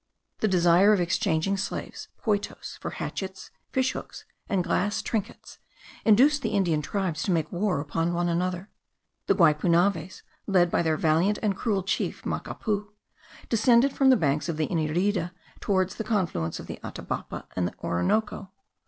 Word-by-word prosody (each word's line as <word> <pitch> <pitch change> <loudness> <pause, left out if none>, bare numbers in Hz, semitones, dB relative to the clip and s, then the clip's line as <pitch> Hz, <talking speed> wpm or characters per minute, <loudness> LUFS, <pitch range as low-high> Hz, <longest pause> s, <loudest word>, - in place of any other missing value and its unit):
The 220 - +2
desire 180 +2 +5
of 205 - +2
exchanging 175 +1 +1
slaves 195 - -5 0.2
(poitos) 210 -2 -2
for - - -4
hatchets, 190 -1 -6 0.2
fish 260 0 +1
hooks, - - -8 0.2
and 195 -4 +1
glass 205 +5 0
trinkets, 215 -1 -4 0.4
induced 270 +7 +5
the 220 - -2
Indian 170 -6 +2
tribes 180 0 -2
to 195 - 0
make 160 -3 0
war 180 -3 0
upon 165 +3 -1
one 175 0 0
another. 180 +3 -2 0.6
The - - +4
Guipunaves, 170 +2 +2 0.2
led 180 -3 +4
on - - -14
by - - +2
their 160 -2 +1
valiant 165 +7 +2
and 205 -2 +1
cruel 200 -2 -1
chief 190 - -2
Macapu, 210 -2 -3 0.6
descended 235 +4 +4
from 270 -1 +4
the 260 - +6
banks 150 -2 0
of 160 - -2
the 155 - +1
Inirida 175 +3 0 0.3
towards 190 -2 0
the 220 - -4
confluence 180 - -1
of - - -8
the - - -7
Atabapo - - -5
and 90 -1 0
the - - -8
Orinoco. 190 - 0
185 Hz, 160 wpm, -26 LUFS, 165-210 Hz, 0.6 s, the